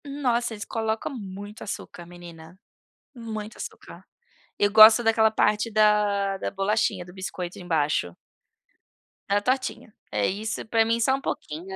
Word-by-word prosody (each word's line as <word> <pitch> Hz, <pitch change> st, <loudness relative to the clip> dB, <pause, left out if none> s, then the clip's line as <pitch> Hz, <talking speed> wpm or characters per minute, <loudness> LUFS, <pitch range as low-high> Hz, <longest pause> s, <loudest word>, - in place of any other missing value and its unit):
Nossa, 250 Hz, -5 st, -1 dB
eles 205 Hz, -2 st, -7 dB
colocam 220 Hz, +3 st, -3 dB
muito 205 Hz, -1 st, -8 dB
açúcar, 175 Hz, -3 st, -7 dB
menina, 170 Hz, 0 st, -13 dB, 0.6 s
muito 220 Hz, -3 st, -7 dB
açúcar. -, -, -10 dB, 0.5 s
Eu 205 Hz, -, +3 dB
gosto 220 Hz, +2 st, +9 dB
daquela 225 Hz, -1 st, +4 dB
parte 210 Hz, +1 st, +1 dB
da 210 Hz, -2 st, +2 dB
da -, -, -3 dB
bolachinha, 195 Hz, -1 st, 0 dB
do 180 Hz, -, -13 dB
biscoito 185 Hz, -1 st, -6 dB
embaixo. 150 Hz, -, -1 dB, 1.1 s
Da 200 Hz, +1 st, +3 dB
tortinha. 255 Hz, -2 st, -2 dB, 0.2 s
É 105 Hz, -1 st, +1 dB
isso, 220 Hz, +4 st, -4 dB
pra 225 Hz, 0 st, +3 dB
mim 230 Hz, +1 st, +1 dB
só 265 Hz, +3 st, +2 dB
um 270 Hz, -, -6 dB
pouquinho 165 Hz, -, -5 dB
210 Hz, 140 wpm, -25 LUFS, 185-225 Hz, 1.1 s, gosto